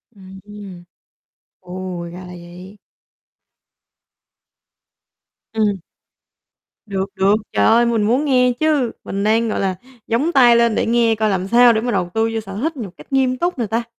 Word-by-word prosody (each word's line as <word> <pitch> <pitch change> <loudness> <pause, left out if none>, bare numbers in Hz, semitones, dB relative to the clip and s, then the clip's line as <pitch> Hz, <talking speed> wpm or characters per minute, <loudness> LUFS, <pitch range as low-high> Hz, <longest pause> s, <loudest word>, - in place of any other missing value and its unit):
Ừm. 195 -1 -12 0.8
Ồ, 180 -1 -7
ra 180 - -9
là 180 - -10
vậy. 180 +3 -12 2.8
Ừm. 210 -3 0 1.1
Được, 195 -2 -3
được, 195 +2 +3 0.2
trời 100 -1 +2
ơi, 235 +1 +4
mình 230 -2 +1
muốn 250 +8 +1
nghe 250 -3 +3
chứ. 295 -7 +1
Mình 195 +1 -4
đang, 225 +2 +1
gọi - - -2
là, 190 -1 -1 0.3
dóng 255 +9 0
tai 245 -6 +5
lên 235 -2 +2
để - - 0
nghe 230 -1 +2
coi 215 0 0
làm 190 -1 -2
sao 240 +2 +5
để 220 - 0
mà 245 +1 -2
đầu 185 -5 -1
tư 225 0 +1
vô 225 - -1
sở 195 -2 -9
thích 320 +1 -2
nhột 205 -8 -7
cách - - -14
nghiêm 260 -1 +1
túc 350 0 -2
nè 235 - 0
ta. 230 +3 -1
220 Hz, 165 wpm, -19 LUFS, 190-240 Hz, 2.8 s, tai